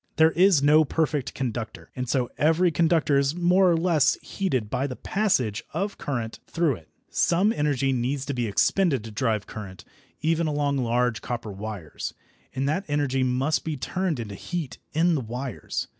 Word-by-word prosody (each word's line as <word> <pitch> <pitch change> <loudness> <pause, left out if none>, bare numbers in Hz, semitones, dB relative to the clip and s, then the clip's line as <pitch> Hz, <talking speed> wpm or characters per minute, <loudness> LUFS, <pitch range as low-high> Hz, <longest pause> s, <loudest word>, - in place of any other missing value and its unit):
There 160 0 +5
is 180 -5 +4
no 150 +2 +6
perfect 150 -2 -1
conductor, 120 -3 -4
and 125 -1 -4
so 125 -3 0
every 165 +4 +3
conductor 160 -3 +3
is 140 +3 +1
more 180 +2 +4
or 170 - +3
less 165 -4 +3
heated 135 - -1
by 135 +6 -1
the 130 - -5
passage 135 - 0
of 200 +4 -2
current 120 -5 -3
through 165 -7 +1
it. 80 - -19 0.2
Some 190 +6 +3
energy 140 - +1
needs 130 +3 -1
to 140 - -2
be 120 -3 -1
expended 135 - +2
to 110 - -8
drive 110 -1 0
current, 100 -4 -9 0.3
even 165 +1 +1
along 145 -2 0
large 120 -1 +1
copper 120 -3 -4
wires, 100 -5 -6 0.4
and 135 +1 0
that 155 +7 0
energy 145 -3 0
must 130 +4 +1
be 155 -2 -3
turned 180 +1 -2
into 105 -3 -5
heat 150 - -5
in 170 +3 +3
the 150 - 0
wires. 125 +1 -4
140 Hz, 175 wpm, -25 LUFS, 120-165 Hz, 0.4 s, no